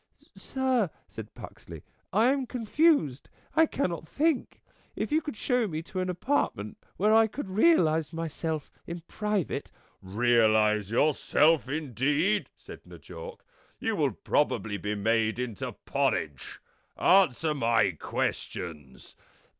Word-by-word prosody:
" - - -37
Sir," 260 -7 0 0.2
said - - -10
Puxley, - - -11
" - - -43
I 225 +6 +4
am 270 -2 -2
confused. 245 - +1 0.3
I 320 0 +5
cannot 170 - -2
think. 305 -2 0 0.4
If - - -3
you 310 +1 +3
could 295 -8 -6
show 250 -2 +1
me 160 -3 -4
to 185 +2 -6
an 185 0 -1
apartment 180 - -1 0.2
where 210 +3 +3
I 225 0 +6
could 220 +1 -6
realize 180 - +3
myself 160 -2 -4 0.2
in 170 0 -6
private... 210 +1 -3 0.2
." - - -41
"Realize 110 0 +2
yourself, 150 +3 +3
indeed!" 150 - 0
said - - -12
N' 85 - -11
Jawk. 80 +2 -10 0.3
"You - - -1
will - - +1
probably 105 -2 0
be 105 +1 -3
made 110 +2 +1
into 125 -4 -4
porridge. 70 -5 -2 0.4
Answer 165 -5 +4
my 115 -7 +2
questions." 75 -3 -5
160 Hz, 130 wpm, -28 LUFS, -, 0.4 s, I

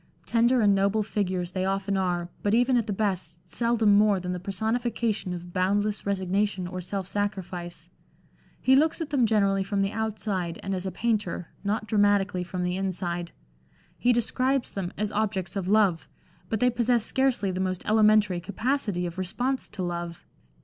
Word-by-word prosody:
Tender 235 +1 +3
and 205 -2 +5
noble 200 +2 +2
figures 185 -4 -2
they 185 0 -2
often 195 +1 0
are, 175 -2 0
but 205 +1 +2
even 245 +2 +3
at 235 -2 +1
the - - -1
best 185 -5 -1
seldom 230 -3 +3
more 205 -1 +4
than 180 0 -3
the 180 - -4
personification 220 +1 -1
of 175 0 -7
boundless 205 +3 0
resignation 195 0 0
or 185 +1 -5
self 190 +1 -3
sacrifice. 180 -4 -4 0.7
He 265 - +4
looks 310 +5 +3
at 315 -3 -4
them 255 -5 +3
generally 200 -3 +2
from 195 0 0
the 195 - -1
outside 210 -6 -2
and 195 - -2
as 185 0 -3
a - - -3
painter, 205 -4 -1
not 210 +2 -1
dramatically 205 -3 +2
from 180 0 -4
the 180 +1 -1
inside. 175 -2 -3 0.6
He 245 - +2
describes 255 +3 0
them 185 -3 -3
as 210 0 -1
objects 200 -4 -1
of 190 -2 -2
love, 200 -5 +3 0.4
but 220 - -1
they 250 0 +4
possess 240 -1 +1
scarcely 260 -7 +1
the 185 +1 -2
most 185 -1 -2
elementary 215 -3 +4
capacity 205 -1 -1
of 175 +1 -5
response 245 +8 -2
to 195 -3 -5
love. 170 -1 -4
200 Hz, 170 wpm, -27 LUFS, 185-220 Hz, 0.7 s, and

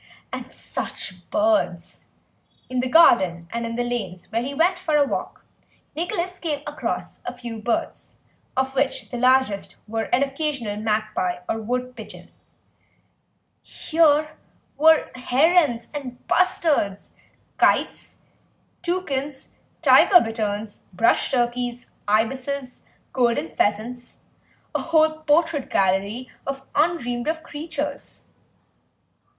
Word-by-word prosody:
And - - -6
such 180 -2 -7
birds! 180 -5 0 0.7
In 255 - 0
the 255 0 0
garden, 190 - +5
and 235 0 -2
in 230 - -4
the 245 - 0
lanes 205 -8 -4
when 230 +2 -1
he 280 - -4
went 350 +4 +2
for 320 -5 0
a 290 - +4
walk, - - -5 0.5
Nicholas 355 +2 -2
came 295 -4 -2
across 295 +1 -4
a - - -4
few 235 -3 -7
birds, 235 +2 -3 0.4
of 265 0 0
which 275 0 -1
the 245 - -4
largest 255 -5 +2
were 225 +1 -2
an 250 +3 +2
occasional 275 -6 -2
magpie 215 -4 -1
or 225 - -1
wood 250 +3 -3
pigeon; 220 -3 -11 1.3
here 310 -2 +2 0.5
were 320 +1 +4
herons 265 0 +2
and 265 -4 -6
bustards, 315 - +1 0.4
kites, - - +1 0.6
toucans, 295 -6 -2 0.3
tiger 365 -3 +7
bitterns, 215 -4 -3
brush 210 +6 +2
turkeys, 245 -1 -1 0.2
ibises, 255 +5 -1 0.3
golden 235 -11 +1
pheasants, 240 +4 -1 0.6
a - - 0
whole 315 -1 +2
portrait 310 -1 +1
gallery 200 +6 +1 0.2
of 270 0 -4
undreamed 275 -6 0
of 320 0 -1
creatures. 295 -2 -6
250 Hz, 110 wpm, -23 LUFS, 225-300 Hz, 1.3 s, tiger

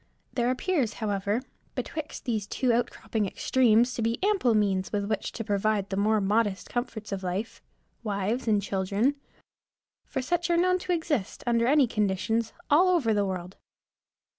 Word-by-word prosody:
There 240 -1 +1
appears, 260 - 0
however, 205 +2 -1 0.3
betwixt 310 -1 -5
these 220 -5 -1
two 250 +3 +1
outcropping 230 -3 -1
extremes 240 +3 +3
to - - -3
be 230 +1 0
ample 390 - +3
means 195 -3 +1
with 205 -1 -1
which 215 -1 -2
to 225 - -4
provide 205 -1 0
the - - 0
more 215 +2 +2
modest 205 0 0
comforts 230 -3 -4
of 195 -1 -3
life 190 +5 -4 0.4
wives 215 +4 -1
and 210 -2 +4
children: 200 +7 +1 0.9
for 265 - -3
such 345 +5 0
are 340 - +3
known 365 +1 +3
to 360 - -4
exist, 315 - -1
under 235 -1 +2
any 285 0 +5
conditions, 220 +1 0 0.2
all 330 +6 +5
over 300 -12 +3
the 205 -1 +1
world. 185 0 -5
225 Hz, 160 wpm, -27 LUFS, 200-255 Hz, 0.9 s, any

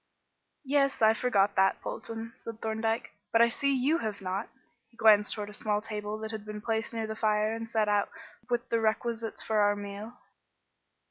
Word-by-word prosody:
"Yes, 275 -3 +2
I 220 0 +7
forgot 205 -4 +2
that, 190 0 +4
Polton," 225 0 -6
said 225 -1 -9
Thorndyke, 225 +1 -1 0.2
"but 230 - +4
I 235 0 +6
see 280 +4 0
you 275 +5 +2
have 215 -2 -3
not." 190 +3 -3 0.4
He 230 - -26
glanced 210 -2 +5
towards 210 -1 -5
a - - -13
small 210 -1 0
table 210 -1 -5
that 220 0 -4
had 220 -2 -5
been 210 0 -6
placed 225 +1 -1
near 225 -1 -2
the 220 0 -4
fire 215 0 +1
and 225 0 -5
set 220 -2 +1
out 205 -1 +2 0.4
with 240 0 0
the 230 - +2
requisites 225 +1 -1
for 220 -1 +1
our 205 0 +4
meal. 205 +3 -7
220 Hz, 190 wpm, -29 LUFS, 210-230 Hz, 0.4 s, I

